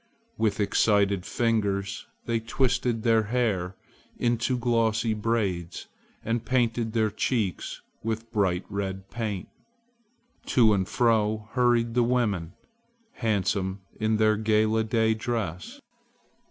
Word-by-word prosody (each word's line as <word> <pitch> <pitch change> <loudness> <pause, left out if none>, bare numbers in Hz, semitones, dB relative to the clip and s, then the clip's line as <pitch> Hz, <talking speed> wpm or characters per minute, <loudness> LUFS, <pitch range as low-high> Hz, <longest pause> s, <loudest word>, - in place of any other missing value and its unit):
With 110 -2 0
excited 100 -2 +2
fingers 100 -4 -1 0.2
they 115 -1 0
twisted 120 0 0
their 115 -2 +3
hair 100 -6 0 0.4
into 120 +1 +1
glossy 115 -2 +1
braids 100 -6 -2 0.4
and 115 +1 -1
painted 115 -3 0
their 110 -2 +2
cheeks 105 -3 -2 0.2
with 115 +1 -4
bright 95 -4 +1
red 95 -1 -4
paint. 105 -5 -3 1.0
To 115 -4 +5
and 95 -2 0
fro 110 -2 +1
hurried 120 -2 +2
the 125 - +3
women, 110 -9 0 0.6
handsome 100 -3 -1 0.2
in 110 0 +1
their 110 0 +3
gala 110 0 +2
day 110 0 +2
dress. 110 - -4
110 Hz, 110 wpm, -27 LUFS, 100-115 Hz, 1.0 s, To